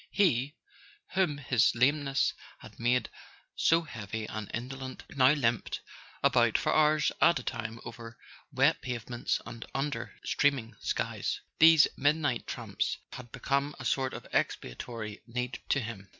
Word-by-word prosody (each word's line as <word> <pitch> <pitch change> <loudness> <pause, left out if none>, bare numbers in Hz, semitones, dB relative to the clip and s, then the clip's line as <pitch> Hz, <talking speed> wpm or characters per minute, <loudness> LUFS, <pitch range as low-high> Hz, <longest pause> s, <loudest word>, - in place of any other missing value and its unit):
He, 145 - +2 0.6
whom 180 -7 +2
his 125 -6 +2
lameness 140 +2 +2 0.2
had - - -14
made 120 0 +2 0.5
so 165 +1 +3
heavy 110 -6 -5
and 110 -1 -6
indolent, 130 +2 -6
now 130 0 +5
limped 120 -6 0 0.4
about - - +4
for - - 0
hours 155 -1 +4
at 170 - +6
a 125 - -5
time 115 -2 -4
over 115 0 -9 0.3
wet 140 +4 +3
pavements 120 -1 -2
and 115 -1 -8
under 140 +1 -3
streaming 130 -6 +1
skies: - - -2 0.2
these 160 -1 +8
midnight 145 -3 +1
tramps - - -2 0.2
had 120 -2 -9
be¬ 135 - -11
come 140 +1 +1
a 130 - -8
sort 130 +2 0
of - - -8
expiatory 105 - -3
need 125 +1 -3
to 135 - +3
him. 110 -5 -7
130 Hz, 140 wpm, -30 LUFS, 115-145 Hz, 0.6 s, these